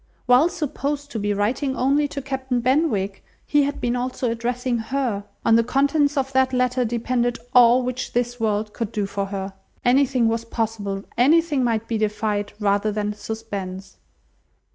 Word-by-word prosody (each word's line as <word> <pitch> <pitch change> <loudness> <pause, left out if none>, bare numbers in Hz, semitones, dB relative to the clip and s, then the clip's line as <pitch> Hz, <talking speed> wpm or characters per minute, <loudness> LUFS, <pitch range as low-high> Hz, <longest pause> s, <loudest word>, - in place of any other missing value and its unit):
While 255 +7 +5
supposed 290 -3 -3
to 225 - -3
be 205 0 -1
writing 245 +7 0
only 280 +3 +2
to 280 -1 -6
Captain 265 -2 -2
Benwick, 240 -7 0 0.2
he 295 - +3
had 285 +1 -3
been 240 0 0
also 250 -1 -2
addressing 240 +1 -1
her! 225 -4 -2 0.2
On 225 - +5
the 230 - +4
contents 285 +4 +2
of 270 0 -1
that 260 0 +3
letter 250 0 +1
depended 240 +1 0 0.2
all 245 0 +6
which 255 0 -4
this 245 0 -1
world 210 -1 -1
could 230 -2 -4
do 210 -3 -1
for 195 0 -3
her. 195 0 -5 0.3
Anything 255 -1 +3
was 230 0 0
possible, 215 -4 -3 0.2
anything 300 +1 +4
might 230 -2 0
be 225 -2 -1
defied 210 -1 -1
rather 205 0 +1
than 210 0 -2
suspense. 200 -3 -6
240 Hz, 165 wpm, -23 LUFS, 215-265 Hz, 0.3 s, all